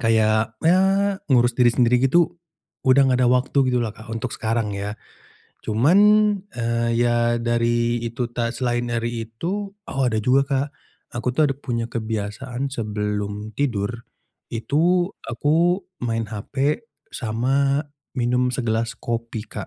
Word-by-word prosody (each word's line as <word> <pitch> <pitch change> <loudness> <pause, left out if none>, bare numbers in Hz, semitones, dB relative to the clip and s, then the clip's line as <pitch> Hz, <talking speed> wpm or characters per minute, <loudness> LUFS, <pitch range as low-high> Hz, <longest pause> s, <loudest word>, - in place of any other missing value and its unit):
kayak, 110 -1 +2
eee, 190 +3 +3
ngurus 120 -3 +4
diri 120 0 +4
sendiri 120 0 +3
gitu, 170 +4 +3 0.5
udah 130 +1 +4
nggak 125 - +2
ada 125 - +4
waktu, 125 +3 +1
gitulah, 120 -3 0
Kak, 110 +1 -14
untuk 115 +2 -4
sekarang, 110 -2 -1
ya. 100 +1 -4 0.6
Cuman, 125 - +3 0.6
eee, 115 0 0
ya, 120 0 +2
dari 120 0 +1
itu 120 +1 -3
ta 120 0 -2
selain 120 0 -1
dari 115 -1 -2
itu 195 - -4 0.2
oh, 135 - -1
ada 110 -3 0
juga, 135 +4 +3
Kak. 135 0 0 0.5
Aku 125 +1 -1
tuh, 150 0 +3
ada - - -1
punya 120 -4 -3
kebiasaan, 115 +4 -3
sebelum 105 -2 -3
tidur, 110 -8 0 0.6
itu, 175 - +1 0.2
aku 170 +9 +1 0.2
main 115 -2 -2
hape, 140 - -2 0.2
sama 135 +5 0 0.3
minum 125 0 +1
segelas 115 -2 -1
kopi, 115 -1 -4
Kak. 105 - -6
120 Hz, 135 wpm, -22 LUFS, 115-135 Hz, 0.6 s, ngurus